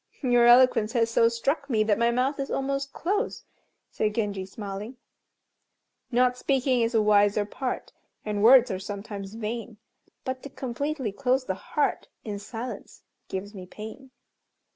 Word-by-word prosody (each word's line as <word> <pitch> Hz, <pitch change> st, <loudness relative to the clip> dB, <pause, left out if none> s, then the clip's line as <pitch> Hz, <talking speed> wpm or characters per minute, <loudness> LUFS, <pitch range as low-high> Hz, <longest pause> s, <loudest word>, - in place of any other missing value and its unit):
"Your 245 Hz, -2 st, +5 dB
eloquence 240 Hz, -3 st, +5 dB
has 230 Hz, -2 st, +2 dB
so 230 Hz, 0 st, +4 dB
struck 275 Hz, +5 st, -1 dB
me 220 Hz, -4 st, +3 dB
that 215 Hz, 0 st, +1 dB
my 235 Hz, 0 st, +3 dB
mouth 255 Hz, +4 st, 0 dB
is 275 Hz, -, -3 dB
almost 275 Hz, 0 st, -2 dB
closed," 410 Hz, +6 st, -2 dB, 0.5 s
said 210 Hz, -1 st, -1 dB
Genji, 200 Hz, -4 st, -2 dB
smiling 205 Hz, +4 st, -7 dB, 1.1 s
"Not 250 Hz, 0 st, +3 dB
speaking 260 Hz, -1 st, +1 dB
is 230 Hz, +1 st, 0 dB
a 220 Hz, -, +5 dB
wiser 205 Hz, 0 st, +4 dB
part, 250 Hz, +5 st, -4 dB, 0.3 s
And 210 Hz, -1 st, -2 dB
words 245 Hz, +2 st, +7 dB
are 185 Hz, -, -3 dB
sometimes 200 Hz, 0 st, -7 dB
vain, 230 Hz, 0 st, -5 dB, 0.5 s
But 260 Hz, 0 st, -3 dB
to 280 Hz, -, -8 dB
completely 265 Hz, -1 st, -3 dB
close 255 Hz, +4 st, 0 dB
the 190 Hz, -, -1 dB
heart 285 Hz, +9 st, -1 dB, 0.2 s
In 205 Hz, -2 st, -5 dB
silence, 225 Hz, +1 st, -7 dB, 0.2 s
gives 200 Hz, +2 st, -5 dB
me 185 Hz, -3 st, -9 dB
pain." 220 Hz, +7 st, -10 dB
235 Hz, 150 wpm, -26 LUFS, 210-260 Hz, 1.1 s, words